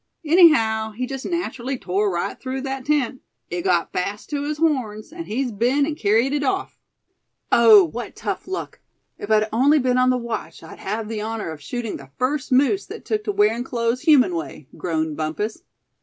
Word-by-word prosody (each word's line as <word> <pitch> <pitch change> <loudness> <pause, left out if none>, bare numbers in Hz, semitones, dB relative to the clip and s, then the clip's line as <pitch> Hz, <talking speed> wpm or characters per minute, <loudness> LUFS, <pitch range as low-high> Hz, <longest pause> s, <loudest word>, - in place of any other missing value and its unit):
Anyhow 225 -10 +4
he 250 +4 -3
jest 270 +1 -5
natchrally 270 -7 -3
tore 195 +3 0
right 175 -1 -3
through 260 0 -4
that 270 -1 -4
tent. 275 -4 0 0.3
It 175 0 -2
got 175 -2 +1
fast 200 +7 -3
to 290 -1 -1
his 295 +1 -3
horns, 260 -7 -1
and 335 -1 -7
he's 250 +3 -2
been 245 +7 +2
an' 310 - -2
kerried 230 +2 +2
it 290 - 0
off." 385 +8 -2 0.7
"Oh! 220 -4 +8
what 230 +9 -6
tough - - -4
luck. 375 0 -5 0.4
If 205 - -7
I'd 215 0 +3
only 275 +7 +4
been 255 -2 +2
on 255 0 +4
the 255 - +2
watch 235 -2 -5
I'd - - -11
have 220 0 -3
the 220 -1 -4
honor 220 -5 -4
of 155 -2 -9
shooting 235 - -4
the 140 -1 -13
first 265 +2 -1
moose 280 +10 +3
that - - -9
took 430 -1 -2
to - - 0
wearin' 225 - +2
clothes 240 -1 -1
human 275 - +5
way," 155 -4 -6
groaned 160 -3 -2
Bumpus. 205 - -3
240 Hz, 190 wpm, -22 LUFS, 210-280 Hz, 0.7 s, Oh